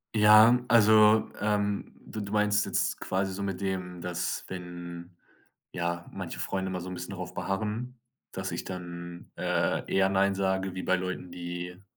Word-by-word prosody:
Ja, 110 +3 +8
also, 110 -1 +6
ähm, 105 -1 0
du 110 - -6
du 100 0 -6
meinst 105 0 +2
jetzt - - 0
quasi 95 0 -1
so 100 - -5
mit 95 -1 -3
dem, 90 -2 -3
dass 90 0 -3
wenn 85 -1 -8 0.5
ja, 85 0 -3
manche - - -5
Freunde 95 -1 -2
immer 90 -1 -3
so 90 - -7
'n - - -5
bisschen 90 +2 -6
drauf 90 -1 -6
beharren, 105 +7 -3 0.3
dass - - -4
ich - - -3
dann, 85 -1 -7
äh, - - 0
eher 95 0 +4
nein 100 0 +2
sage 95 -1 0
wie 95 - -4
bei 95 0 +2
Leuten, 90 -1 -4
die 90 +1 -6
95 Hz, 165 wpm, -29 LUFS, 90-105 Hz, 0.5 s, Ja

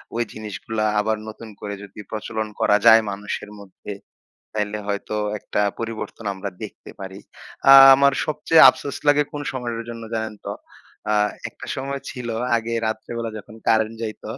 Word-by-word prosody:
ঐ - - -2 0.2
জিনিসগুলা 110 0 -4
আবার 110 +1 0
নতুন 110 +1 -10
করে 100 -1 -4
যদি 100 +1 -12
প্রচলন 110 0 -3
করা 105 - +4
যায় 110 0 +9
মানুষের 100 +1 -5
মধ্যে। 100 +1 -10 0.6
তাইলে 105 0 -2
হয়তো 100 +1 -3 0.2
একটা 105 - -2 0.2
পরিবর্তন 115 -1 -6
আমরা 95 +1 -5
দেখতে - - -9
পারি। 95 +1 -8 0.5
আ - - +11 0.2
আমার 140 0 +4
সবচেয়ে 155 +1 +5
আফসোস 140 - -6
লাগে 145 0 +5
কোন 145 0 -4
সময়ের 120 -3 -4
জন্য 115 -1 -8
জানেন 110 -1 -3
তো? - - -2 0.6
আ 105 - +3 0.3
একটা - - -12
সময় 140 +1 -4
ছিল 125 -3 -6 0.3
আগে 115 0 -3
রাত্রেবেলা 115 +1 -4
যখন 105 +1 -12
কারেন্ট 110 0 +2
যাইত 110 -1 -6
110 Hz, 155 wpm, -22 LUFS, 105-115 Hz, 0.6 s, আ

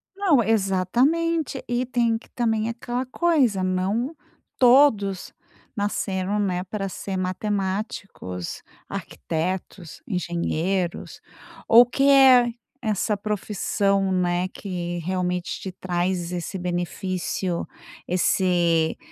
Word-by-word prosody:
Não, 335 - +3
exatamente 250 - +1
e 245 +1 0
tem 235 -2 +1
que - - -17
também 225 -2 0
aquela 240 +2 -3
coisa, 255 - +2
não 200 - -1 0.4
todos 240 -7 +4 0.4
nasceram, 205 -1 -1
né, 180 -3 0
para 195 0 -4
ser 190 +1 -5
matemáticos, 190 - -3 0.3
arquitetos, 175 +1 -4
engenheiros 175 -1 -2 0.5
ou 235 +2 +8
que 275 +3 +2
é 260 -3 +7 0.3
essa 215 -1 0
profissão, 200 -1 0
né, 180 0 +1
que 175 -3 -5
realmente 180 0 -2
te 190 - -6
traz 180 -1 -2
esse 180 +2 -4
benefício 180 0 -2 0.4
esse 175 -2 +2
195 Hz, 95 wpm, -24 LUFS, 180-235 Hz, 0.5 s, ou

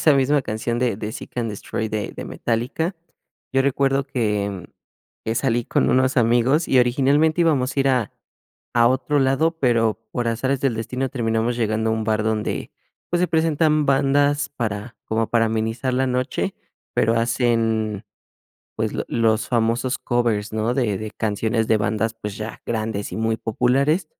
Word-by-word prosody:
esa 155 - +5
misma 140 +2 +3
canción 115 +1 -3
de 125 -5 0
de 110 +1 -5
Seek& - - -8 0.2
Destroy 110 +1 -4
de 110 -1 -3
de - - -5
Metallica. 125 - -2 0.6
Yo 135 0 +3
recuerdo 135 0 +1
que 105 -7 -2 0.6
que 110 - -1
salí 120 -1 +1
con - - +1
unos 130 +1 +2
amigos 120 +7 +3
y 130 - +4
originalmente 140 +7 +3
íbamos 140 -6 +1
a 140 - +3
ir 135 - +2
a 125 -6 +1 0.6
a 120 0 +6
otro 130 +3 +1
lado, 135 +4 +2
pero 115 -4 +2
por 120 -1 -1
azares 130 +4 0
del 135 -4 +1
destino, 125 +4 -3
terminamos 115 -1 0
llegando 110 -1 0
a 110 - +2
un 110 -1 -2
bar 110 0 0
donde, 110 -1 -2 0.4
pues, 175 - +1
se 180 - +2
presentan 155 -2 +2
bandas 145 +1 +2
para, 115 -4 -4
como 110 0 0
para 115 -1 +3
amenizar 115 +3 -1
la 130 +1 +2
noche. 125 +1 -1 0.4
Pero 115 +1 +2
hacen, 115 -3 0 0.7
pues, - - -2
lo - - -3
los 115 -1 +1
famosos 120 +2 0
covers, 115 -4 -1
¿no? 110 +2 0
De 110 -7 +1
de 110 -1 -5
canciones 110 +1 -1
de 110 - +4
bandas, 110 +2 -1
pues, 105 -3 -7
ya 110 0 -6
grandes 110 -2 -2
y - - -4
muy 110 0 +1
populares 135 - +1
120 Hz, 165 wpm, -22 LUFS, 110-135 Hz, 0.7 s, a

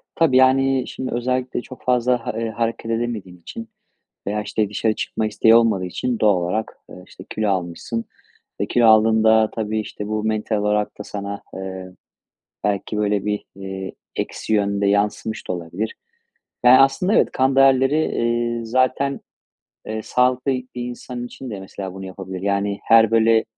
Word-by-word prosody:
Tabii, 150 -6 +3
yani, 130 0 +4
şimdi 130 - -5
özellikle 125 +1 -1
çok 130 - -12
fazla 125 -1 +1
ha - - -2
eee, 115 -1 -2
hareket 115 +1 -2
edemediğin 110 -6 -3
için 230 - -8 0.6
veya, 105 +1 -1
işte, 105 0 -1
dışarı 110 +1 0
çıkma 110 - -2
isteği 110 +1 +4
olmadığı 110 -5 +3
için 120 +6 -2
doğal 105 -3 +4
olarak, 90 +6 -2
ııı, 90 - -11
işte, 95 - -13
kilo 110 -2 -1
almışsın. 95 +5 -3 0.5
E, - - -1
kilo 120 -1 +3
aldığında, 110 0 +5
tabii, 110 -1 -2
işte, 105 0 -6
bu 110 0 -2
mental 110 0 -1
olarak 105 0 0
da - - -5
sana, 100 0 -6
eee, 95 -1 -7 0.7
belki 105 +1 -1
böyle 105 -1 0
bir, 105 0 -2
eee, 95 -1 -6 0.2
eksi - - -3
yönde 100 -1 +1
yansımış 105 +2 0
da - - +1
olabilir. 90 +5 -4 0.7
Ya, 130 +2 +8
aslında 135 +9 +2
evet. - - +3
Kan 130 0 +1
değerleri, 135 +1 +5
eee, 120 0 -1
zaten, 130 +3 +1 0.7
eee, 110 0 -4
sağlıklı 125 +3 +1
bir 130 -1 -3
insan 120 0 -6
için 130 +1 -8
de 100 -3 -6
mesela, 95 0 -7
bunu 95 0 -7
yapabilir. 95 0 -7
Yani, 100 0 0
her 115 -1 +6
böyle, 115 0 +4
110 Hz, 160 wpm, -21 LUFS, 100-125 Hz, 0.7 s, Ya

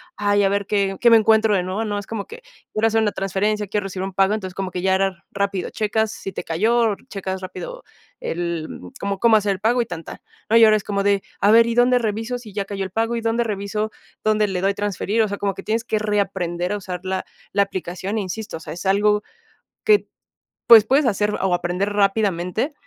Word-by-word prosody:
ay, 205 0 +2
a - - +4
ver 200 0 0
qué 195 -1 0
qué 240 - +6
me 230 - +8
encuentro 220 0 +4
de 185 -3 +2
nuevo, 185 +5 -2
¿no?, 205 -2 -2
es 200 - -9
como 225 -3 -5
que 475 +2 -11 0.3
quiero 220 +1 +2
hacer 225 0 +2
una 210 -2 +1
transferencia, 200 +2 -1
quiero 205 +1 -1
recibir 190 0 -4
un 195 - -6
pago, 195 +2 +3
entonces 190 -4 -4
como 190 -1 -3
que 180 0 -4
ya 190 0 +2
era 190 -2 -1
rápido, 200 -2 -2
checas 220 0 -1
si 195 -3 -7
te - - -6
cayó, 220 +6 +2
checas 190 -1 -4
rápido - - -7 0.4
el 170 -2 -3 0.3
cómo 200 -1 -2
cómo 230 0 +5
hacer 205 -1 +2
el 190 - -2
pago 235 +4 +2
y - - -1
tan, 165 -4 -7
tan, - - -9 0.3
¿no?, 225 - +3
y 230 - +8
ahora 215 -1 +6
es 205 - -7
como 200 -1 -1
de, 200 -1 +2 0.2
a 205 - +5
ver, 230 +1 +6
¿y 230 - -1
dónde 245 +1 +4
reviso 225 +2 -2
si 220 -4 -12
ya 200 0 -1
cayó 195 -1 -4
el 190 - -8
pago, 230 +3 0
y - - -3
dónde 230 +1 +1
reviso 210 0 -2 0.3
dónde 215 -1 +2
le 185 -2 -2
doy 195 +1 +2
transferir?, 205 +2 -1
o - - 0
sea, 200 0 -4
como 200 -2 -1
que 195 - -8
tienes 225 +1 -1
que 220 -1 -1
reaprender 190 -4 -1
a - - -1
usar 185 -3 -6
la 190 0 -2 0.3
la 200 0 +4
aplicación, 190 +2 -4
e - - 0
insisto, 200 0 -5
o - - -12
sea, - - -8
es 175 +3 -8
algo 210 +2 +3 0.6
que, 425 -2 +4 0.6
pues, 225 -2 +9
puedes 275 +4 +3
hacer 210 -1 +1
o 190 -2 +1
aprender 180 +4 -1
rápidamente, 200 - 0
205 Hz, 235 wpm, -21 LUFS, 190-220 Hz, 0.6 s, pues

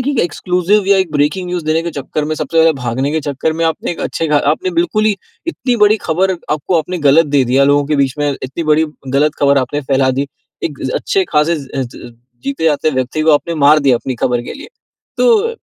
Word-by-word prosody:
कि 285 - 0
एक 255 - -2
एक्सक्लूसिव 180 +4 0
या 200 0 +4
एक 180 -5 -1
ब्रेकिंग 150 +6 0
न्यूज़ 175 -3 -3
देने 160 +1 +1
के 170 - -4
चक्कर 150 +3 -3
में, 155 +1 -2
सबसे 165 +1 -2
पहले 160 0 +5
भागने 125 +4 -1
के 160 - 0
चक्कर 145 +3 -1
में 165 - +1
आपने 160 +1 -1
एक - - -9
अच्छे 165 - -2
ख - - -2 0.2
आपने 185 +4 -1
बिल्कुल 215 +5 0
ही 210 -2 +2 0.3
इतनी 250 -7 -1
बड़ी 215 +1 +4
खबर 185 +4 +2 0.2
आपको 155 +3 0
आपने 180 +3 -3
गलत 160 +3 +5
दे 135 - +4
दिया 130 +3 +3
लोगों 145 0 +3
के 150 -1 0
बीच 135 -2 +1
में, 145 -1 +1
इतनी 135 +6 -4
बड़ी 160 +1 +3 0.2
गलत 145 +3 +1
ख़बर 140 -1 +4
आपने 135 +3 -2
फैला 130 0 +3
दी, 135 +2 -1 0.4
एक 145 -5 -4
अ, 130 - -3
अच्छे 190 -1 0
ख़ासे 155 +2 +2
ज़ 140 -3 -8 0.3
ज़ - - -10 0.3
जीते 140 +4 -3
जागते 155 0 +2
व्यक्ति 130 +3 -2
को 160 0 +4
आपने 165 +3 +1
मार 155 +1 +6
दिया, 135 -4 +3
अपनी 130 +1 -4
खबर 120 -1 0
के - - -7
लिए। 290 - -10 0.5
तो 460 -1 +3
155 Hz, 235 wpm, -15 LUFS, 140-175 Hz, 0.5 s, मार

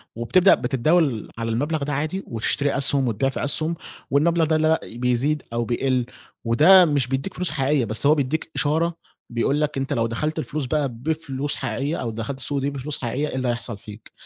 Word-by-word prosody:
وبتبدأ 120 - +4
بتتداول 135 -2 +1
على 115 0 -3
المبلغ 145 +6 -1
ده 145 +1 -2
عادي 155 +7 -2
وتشتري 140 +5 0
أسهُم 135 -1 +4
وتبيع 120 +4 0
في 135 - -4
أسهُم 155 +3 +2 0.4
والمبلغ 165 +4 +3
ده 160 +1 +1
اللي 155 0 +2
لا 160 0 +3 0.2
بيزيد 125 +5 0
أو 120 0 -1
بيقل 125 +1 0 0.4
وده 165 +11 +7
مش 145 -6 +1
بيدّيك 135 +8 -3
فلوس 180 -4 -1
حقيقية 140 -2 +1
بس 110 +5 -1
هو 150 +2 +6
بيدّيك 150 +3 -2
إشارة 165 +3 +1 0.3
بيقول 130 +5 0
لك 150 -2 -1
أنت 135 0 -2
لو 115 0 +1
دخلت 150 +8 -2
الفلوس 155 -2 -3
بقى 145 +1 0
بفلوس 145 +2 -3
حقيقية 145 +3 -3
أو 115 - -3
دخلت 115 +5 -5
السوق 140 +1 -2
دي 135 +1 -1
بفلوس 140 +1 -5
حقيقية 130 +5 -2
إيه - - -6
اللي 130 -1 -1
هيحصل 120 -2 -2
فيك، 105 +1 -13
140 Hz, 195 wpm, -23 LUFS, 120-155 Hz, 0.4 s, وده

